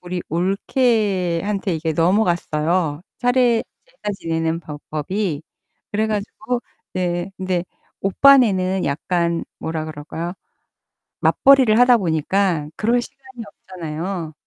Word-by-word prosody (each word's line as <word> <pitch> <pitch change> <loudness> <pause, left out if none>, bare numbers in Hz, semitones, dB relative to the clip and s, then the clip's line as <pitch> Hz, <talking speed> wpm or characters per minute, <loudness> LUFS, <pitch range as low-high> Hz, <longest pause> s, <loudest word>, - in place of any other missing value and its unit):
우리 180 0 -4
올케한테 195 - 0
이게 160 0 -1
넘어갔어요, 170 -3 +1 0.2
차례 245 -2 +3 0.2
제사 - - -29
제사 205 - 0
지내는 165 0 -1
법 150 -3 -9
법이. 160 +1 -2 0.5
그래 215 +1 +1
가지고 215 +3 -3 0.4
예예 175 +1 -1
근데 185 -2 -1 0.4
오빠네는 195 -4 +4
약간 170 +3 -1
뭐라 160 -1 -3
그럴까요 160 +3 -6 0.9
맞벌이를 260 -5 +5
하다 245 0 +6
보니까 170 -2 0
그럴 235 +3 +2
시간이 260 -2 -11
없잖아요. 175 -3 -6
185 Hz, 265 characters per minute, -21 LUFS, 165-215 Hz, 0.9 s, 하다